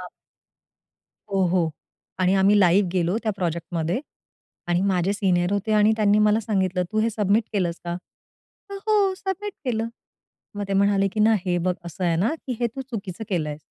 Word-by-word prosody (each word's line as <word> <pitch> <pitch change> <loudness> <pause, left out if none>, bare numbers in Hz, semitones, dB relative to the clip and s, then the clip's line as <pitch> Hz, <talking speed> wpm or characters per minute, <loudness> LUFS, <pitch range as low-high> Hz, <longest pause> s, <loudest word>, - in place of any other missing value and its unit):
अ - - -7 1.3
हो, 195 -1 +2
हो 175 -2 +1 0.5
आणि 185 +1 +3
आम्ही 195 +2 +4
लाइव्ह 185 +1 +4
गेलो 180 +1 +1
त्या 215 - 0
प्रोजेक्टमध्ये 170 +2 -2 0.7
आणि 175 0 +2
माझे 190 -1 +1
सीनियर 185 -3 +1
होते 205 +2 -1
आणि 210 +1 +5
त्यांनी 210 -1 +3
मला 210 +1 +4
सांगितलं, 190 -4 0
"तू 215 - 0
हे 230 +1 +1
सबमिट 210 +1 +1
केलस 175 -5 -1
का?" 170 - -3
म्हंटलं, 395 - -12
"हो, 410 -3 +3
सबमिट 395 +2 -4
केलं." 230 -3 -1 0.7
मग 205 - -2
ते 195 - -2
म्हणाले 195 0 +3
की 215 - -1
ना, 220 +1 +5
"हे 180 -1 +1
बघ 180 - +2
असं 170 +2 -5
आहे 170 -2 +2
ना 210 - +1
की 250 -3 -3
हे 240 - +3
तू - - -3
चुकीचं 205 -2 -5
केलय" 155 -6 -2
195 Hz, 180 wpm, -24 LUFS, 180-220 Hz, 1.3 s, आणि